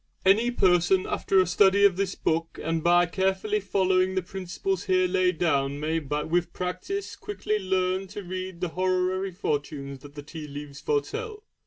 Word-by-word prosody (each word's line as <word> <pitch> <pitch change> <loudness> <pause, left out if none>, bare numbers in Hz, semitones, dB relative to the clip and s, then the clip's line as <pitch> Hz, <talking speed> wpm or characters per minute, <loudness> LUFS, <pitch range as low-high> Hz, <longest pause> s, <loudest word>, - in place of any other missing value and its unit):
Any 215 +5 +5
person 185 -4 +3
after 195 - +1
a 185 - +5
study 195 +3 +4
of 195 -3 +5
this 195 0 -1
book 165 +1 -1
and 165 0 -1
by 175 +1 +5
carefully 190 +4 0
following 190 -1 +1
the 185 - 0
principles 190 0 -3
here 185 -1 +3
laid 180 -1 +1
down 140 -4 +1
may 160 +2 0
with 160 +4 -1
practice 185 - -4
quickly 215 - -3
learn 185 0 0
to 200 +2 -7
read 185 -1 -6
the 180 - -1
horary 185 +2 0
fortunes 145 -6 -3
that 145 +2 -14
the 145 - -7
tea 150 0 -8
leaves 145 0 -8
foretell. 440 0 -2
185 Hz, 165 wpm, -26 LUFS, 165-190 Hz, -, Any